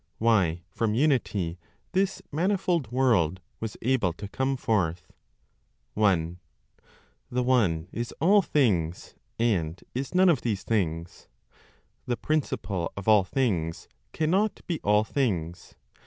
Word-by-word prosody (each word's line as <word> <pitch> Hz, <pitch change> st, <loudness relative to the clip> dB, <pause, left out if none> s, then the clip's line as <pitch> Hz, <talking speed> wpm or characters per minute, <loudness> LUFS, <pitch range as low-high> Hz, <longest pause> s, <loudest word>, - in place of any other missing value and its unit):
WHY 95 Hz, -7 st, +2 dB
FROM 110 Hz, +1 st, 0 dB
UNITY 110 Hz, -, +1 dB, 0.3 s
THIS 190 Hz, 0 st, 0 dB
MANIFOLD 175 Hz, -, 0 dB
WORLD 110 Hz, -10 st, +2 dB, 0.2 s
WAS 110 Hz, -2 st, -5 dB
ABLE 115 Hz, -8 st, +2 dB
TO 100 Hz, +4 st, -8 dB
COME 130 Hz, +4 st, -1 dB
FORTH. 90 Hz, -, -1 dB, 0.8 s
1. 90 Hz, -5 st, +1 dB, 0.9 s
The 125 Hz, 0 st, 0 dB
One 100 Hz, -11 st, +2 dB
is 120 Hz, +1 st, -4 dB
all 200 Hz, +6 st, +5 dB
things, 95 Hz, -, 0 dB, 0.2 s
and 90 Hz, -8 st, 0 dB
is 135 Hz, +6 st, -4 dB
none 185 Hz, +1 st, +6 dB
of 150 Hz, -8 st, +3 dB
these 105 Hz, -5 st, -2 dB
things. 85 Hz, -6 st, -2 dB, 0.8 s
The 120 Hz, -1 st, 0 dB
Principle 100 Hz, -, -2 dB
of 100 Hz, -, -6 dB
all 105 Hz, -3 st, +6 dB
things 95 Hz, -, -1 dB, 0.2 s
cannot 190 Hz, +7 st, +1 dB
be 170 Hz, -3 st, -2 dB
all 105 Hz, +1 st, +4 dB
things. 90 Hz, -, -2 dB
110 Hz, 120 wpm, -27 LUFS, 90-135 Hz, 0.9 s, none